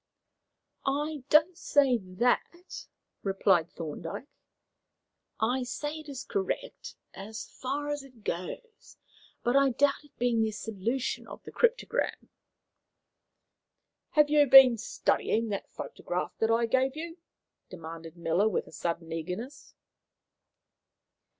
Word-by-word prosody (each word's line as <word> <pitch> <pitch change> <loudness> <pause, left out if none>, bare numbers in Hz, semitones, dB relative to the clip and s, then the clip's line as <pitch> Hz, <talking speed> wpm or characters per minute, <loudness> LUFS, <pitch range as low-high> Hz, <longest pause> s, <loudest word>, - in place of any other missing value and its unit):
"I 290 0 -2
don't 315 +4 +5
say 275 -6 +3
that," 240 - -2 0.3
replied 190 -3 +2
Thorndyke. 165 - -6 1.1
"I 245 +4 +1
say 295 +5 -4
it 310 -1 -11
is 275 -1 -6
correct 405 - -4 0.2
as 215 +2 -7
far 280 +3 -4
as 290 0 -2
it 255 -5 -17
goes; 435 - -6 0.5
but 240 +2 +1
I 275 0 +5
doubt 280 +4 +2
its 295 - -22
being 240 -2 +2
the 220 - +2
solution 225 +5 -3
of - - -10
the - - -10
cryptogram." 485 0 0 1.8
"Have 300 -1 +4
you 295 -1 +5
been 265 -2 +10
studying 225 +1 0
that 200 -1 -4
photograph 180 +1 -4
that 225 - +2
I 230 +1 +3
gave 260 +3 +1
you?" 335 +2 -7 0.5
demanded 165 -1 -9
Miller, 170 +5 +2
with 180 - -3
sudden 165 +1 -3
eagerness. 185 - -6
245 Hz, 115 wpm, -29 LUFS, 195-290 Hz, 1.8 s, been